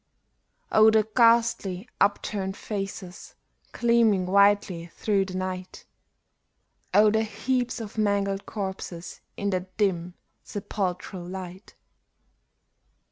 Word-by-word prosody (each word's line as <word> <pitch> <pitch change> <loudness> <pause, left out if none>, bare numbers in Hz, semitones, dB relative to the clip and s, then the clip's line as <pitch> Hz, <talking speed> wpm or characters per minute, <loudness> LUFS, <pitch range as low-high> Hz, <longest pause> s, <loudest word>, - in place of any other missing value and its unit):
Oh, 220 0 +7
the 220 -1 +3
ghastly, 230 -4 +3
upturned 195 -1 0
faces, 195 -3 -6 0.4
gleaming 230 -5 +3
whitely 200 -3 +3
through 200 -3 +1
the 185 -1 -7
night! 185 0 -5 1.1
Oh, 210 0 +6
the 220 +1 +2
heaps 245 +3 -1
of 220 -1 -6
mangled 200 -1 0
corses 190 -4 -6 0.2
in 200 0 -1
that 185 0 -4
dim, 180 -4 0 0.3
sepulchral 185 -2 -4
light 185 +1 -8
200 Hz, 95 wpm, -26 LUFS, 185-215 Hz, 1.1 s, Oh